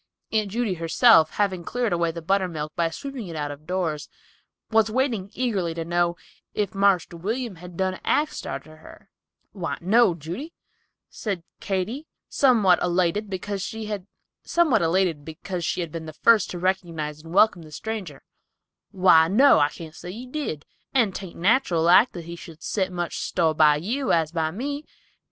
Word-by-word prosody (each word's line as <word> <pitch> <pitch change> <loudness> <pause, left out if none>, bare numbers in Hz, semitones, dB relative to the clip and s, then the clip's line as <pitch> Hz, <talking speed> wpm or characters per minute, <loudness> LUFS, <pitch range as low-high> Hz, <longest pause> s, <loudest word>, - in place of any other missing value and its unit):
Aunt 215 -2 +1
Judy 225 -1 -1
herself, 165 +1 +4
having 190 -4 0
cleared 240 +1 -1
away 170 -1 +1
the 165 0 -6
buttermilk, 170 -5 -1
by 170 -1 +1
sweeping 255 +4 -7
it 165 - -7
out 145 -1 -3
of 145 +2 -11
doors, 175 -5 -2 0.6
was 220 0 +4
waiting 230 -5 -1
eagerly 200 -10 -1
to 165 -1 -4
know 175 0 +1 0.4
"if 205 -3 -1
Marster 195 -3 +2
William 225 +6 -3 0.2
done 185 +1 -1
axed 300 +1 0
arter 155 0 -7
her." 155 - -16 0.4
"Why, 180 -5 -4
no, 200 +1 +4
Judy," 175 - -7 0.5
said 195 -6 -4 0.2
Katy, 215 - -3 0.2
somewhat 220 -10 +4
elated 180 +4 +1
because 195 +1 -4
she 220 +2 -5
had 205 -3 -5 0.4
been 170 - 0
first 230 -3 +5
to 180 - -5
recognize 170 -5 -2
and 165 +1 -12
welcome 200 -1 +4
the 155 -1 -13
stranger. 190 -4 -6 0.7
"Why, 180 -4 +5
no, 245 - +6
I 145 0 +3
can't 160 0 -10
say 175 - -8
he 235 +6 -8
did, 255 - -4 0.3
and 225 -7 +3
'tain't 190 -2 -7
nateral 185 -3 +2
like 185 +9 +6
that 170 -3 -7
he 170 +1 -7
should 165 -1 -12
set 190 -3 0
so 185 - -12
much 175 -1 -3
store 160 -2 +1
by 150 -1 +5
you, 230 - -1
as 160 -2 +2
by 160 -2 0
me. 285 - -4
185 Hz, 160 wpm, -24 LUFS, 165-220 Hz, 0.7 s, no